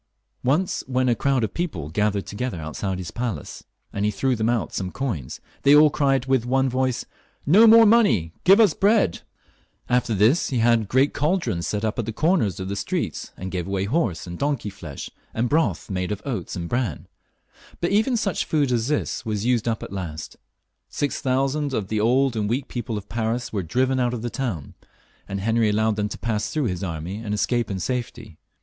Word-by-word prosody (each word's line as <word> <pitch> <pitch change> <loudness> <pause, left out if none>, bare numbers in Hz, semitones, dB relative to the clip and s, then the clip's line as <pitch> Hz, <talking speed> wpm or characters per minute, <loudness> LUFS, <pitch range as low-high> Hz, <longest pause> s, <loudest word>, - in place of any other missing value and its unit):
Once 150 +9 +1
when 130 0 +1
a 120 - +4
crowd 135 +1 +1
of 105 - -2
people 150 - -3
gathered 105 +1 0
together 110 -3 -4
outside 90 +5 -3
his 90 -2 -6
palace, 115 -11 -5 0.3
and 100 - -2
he 105 - +3
threw 130 +4 0
them 110 0 0
out 120 -2 -1
some 95 -2 -2
coins, 100 - -4 0.2
they 140 +1 +6
all 150 0 +7
cried 135 -3 +1
with 130 -3 +2
one 130 +2 +1
voice, 130 0 -1 0.2
" - - -37
No 225 +2 +8
more 225 +1 +8
money; 135 - +4
give 195 +4 +6
us 210 -8 +5
bread! 200 - +2 0.3
" - - -37 0.3
After 125 -3 +1
this 110 - +3
he 130 - -1
had 115 -2 +3
great 130 +6 +2
cauldrons 150 - 0
set 105 +1 -2
up 110 +2 -2
at 115 - -2
the - - -1
comers 155 - +1
of 95 - -4
the 100 - -3
streets, - - -3
and 95 0 -6
gave 90 -1 -3
away 95 -1 -1
horse 100 - -1
and 85 -1 -8
donkey 140 -7 -1
flesh, 75 -7 -8 0.2
and 115 +2 +1
broth 160 +5 +1
made 90 -1 -2
of 105 0 -4
oats 115 -11 -4
and 85 -2 -4
bran. 120 +4 -2 0.7
But 175 - 0
even 220 +5 +2
such 200 -6 -1
food 145 -4 +1
as 120 -1 +1
this 150 0 -1
was 105 -2 -2
used 120 -2 +1
up 115 -1 -1
at - - -8
last. 85 -5 -6 0.5
Six 145 - -2
thousand 135 +1 0
of 100 -2 -3
the 110 - 0
old 125 +3 +2
and 105 -2 -1
weak 130 +4 -1
people 115 -3 -4
of 100 -1 -8
Paris 115 +2 -2
were 100 - 0
driven 130 +10 0
out 125 -1 +1
of 115 - -6
the 120 - -3
town, 110 - -4 0.5
and 100 - -4
Henry 115 +1 +2
allowed 110 +1 +1
them 105 0 -1
to - - -6
pass 110 -2 -2
through 150 -3 -1
his 90 -3 -2
army 85 +2 -4
and 105 -2 -3
escape 120 +2 0
in 95 -2 -3
safety. 115 -4 -4
115 Hz, 210 wpm, -23 LUFS, 100-135 Hz, 0.7 s, No